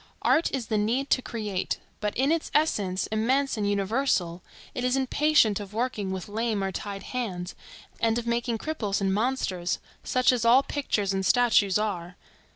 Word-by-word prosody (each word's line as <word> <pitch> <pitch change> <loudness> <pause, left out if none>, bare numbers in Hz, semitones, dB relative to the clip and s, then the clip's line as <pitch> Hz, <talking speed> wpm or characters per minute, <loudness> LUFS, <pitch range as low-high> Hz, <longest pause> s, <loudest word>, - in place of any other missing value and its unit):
Art 330 - +3
is 265 -4 -2
the 215 -1 0
need 245 +7 0
to 255 - +4
create; 210 -6 -3 0.2
but 210 -1 -2
in 270 +4 +2
its 330 -1 0
essence, 200 -12 +1
immense 260 +6 +1
and 205 -2 -1
universal, 200 -4 0 0.3
it 250 - -3
is 250 +1 +2
impatient 265 -5 +3
of 205 0 -9
working 225 -4 -1
with 190 -1 -4
lame 215 -1 -1
or 195 - -1
tied 200 +1 -6
hands, 190 -8 -4 0.5
and 225 0 +2
of 240 - -3
making 235 0 0
cripples 220 -8 -2
and 195 -1 +1
monsters, 200 -6 -1 0.3
such 255 0 +3
as 245 -2 0
all 245 +4 +6
pictures 210 -10 -1
and 190 0 -1
statues 210 -3 +4
are. 180 -4 -3
220 Hz, 170 wpm, -27 LUFS, 195-255 Hz, 0.5 s, all